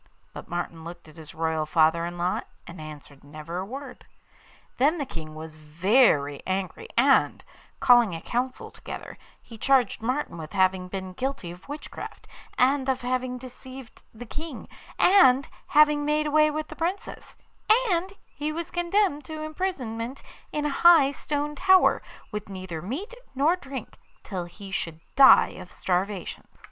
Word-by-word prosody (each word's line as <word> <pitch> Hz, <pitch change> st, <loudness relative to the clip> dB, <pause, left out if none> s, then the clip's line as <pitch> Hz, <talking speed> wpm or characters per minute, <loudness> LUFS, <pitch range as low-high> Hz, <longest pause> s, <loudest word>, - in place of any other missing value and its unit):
But -, -, -9 dB
Martin 170 Hz, -1 st, -4 dB
looked 170 Hz, 0 st, -10 dB
at 155 Hz, +1 st, -16 dB
his 155 Hz, -2 st, -11 dB
royal 160 Hz, -1 st, -1 dB
father 165 Hz, +1 st, +3 dB
in 175 Hz, 0 st, -7 dB
law, 175 Hz, +1 st, 0 dB, 0.2 s
and 170 Hz, -1 st, -10 dB
answered 150 Hz, -2 st, -11 dB
never 155 Hz, +4 st, -7 dB
a 190 Hz, -, -4 dB
word. 265 Hz, +2 st, -8 dB, 0.8 s
Then 295 Hz, +6 st, +3 dB
the 285 Hz, -, -2 dB
King 155 Hz, -8 st, -8 dB
was 155 Hz, 0 st, -9 dB
very 155 Hz, -, +2 dB
angry, 190 Hz, -, -3 dB
and, -, -, +4 dB, 0.4 s
calling 240 Hz, -7 st, +5 dB
a 165 Hz, -, -6 dB
council 255 Hz, +2 st, -3 dB
together, -, -, -9 dB, 0.2 s
he 225 Hz, -2 st, -13 dB
charged 260 Hz, -6 st, +2 dB
Martin 255 Hz, -, -2 dB
with 155 Hz, -1 st, -8 dB
having 185 Hz, -1 st, +2 dB
been 185 Hz, 0 st, -6 dB
guilty 255 Hz, -6 st, -4 dB
of 180 Hz, +9 st, -14 dB
witchcraft, 295 Hz, +1 st, -8 dB, 0.3 s
and 270 Hz, +1 st, +3 dB
of 260 Hz, -1 st, 0 dB
having 250 Hz, 0 st, -2 dB
deceived 255 Hz, 0 st, -11 dB
the 235 Hz, +2 st, -10 dB
King, 300 Hz, +2 st, -7 dB, 0.3 s
and 275 Hz, -8 st, +5 dB, 0.2 s
having 300 Hz, 0 st, +5 dB
made 300 Hz, +1 st, +1 dB
away 305 Hz, +1 st, +4 dB
with 310 Hz, +1 st, -4 dB
the -, -, -9 dB
Princess; 350 Hz, +4 st, -4 dB, 0.5 s
and 355 Hz, +2 st, 0 dB
he 300 Hz, +1 st, -4 dB
was 335 Hz, +2 st, -5 dB
condemned 350 Hz, -3 st, +1 dB
to 310 Hz, -1 st, -6 dB
imprisonment 275 Hz, -8 st, -4 dB, 0.3 s
in 300 Hz, 0 st, -2 dB
a -, -, +1 dB
high 335 Hz, -5 st, +7 dB
stone 295 Hz, +1 st, -3 dB
tower, 375 Hz, +5 st, +4 dB, 0.3 s
with 210 Hz, -1 st, -5 dB
neither 185 Hz, -4 st, -6 dB
meat 290 Hz, -, -5 dB, 0.2 s
nor 295 Hz, +6 st, +3 dB
drink, 270 Hz, -, -8 dB, 0.2 s
till 185 Hz, -4 st, -4 dB
he 195 Hz, +3 st, -11 dB
should 165 Hz, -4 st, -3 dB, 0.2 s
die 270 Hz, -1 st, +8 dB
of 180 Hz, -1 st, -11 dB
starvation. 185 Hz, +1 st, -2 dB
245 Hz, 155 wpm, -26 LUFS, -, 0.8 s, die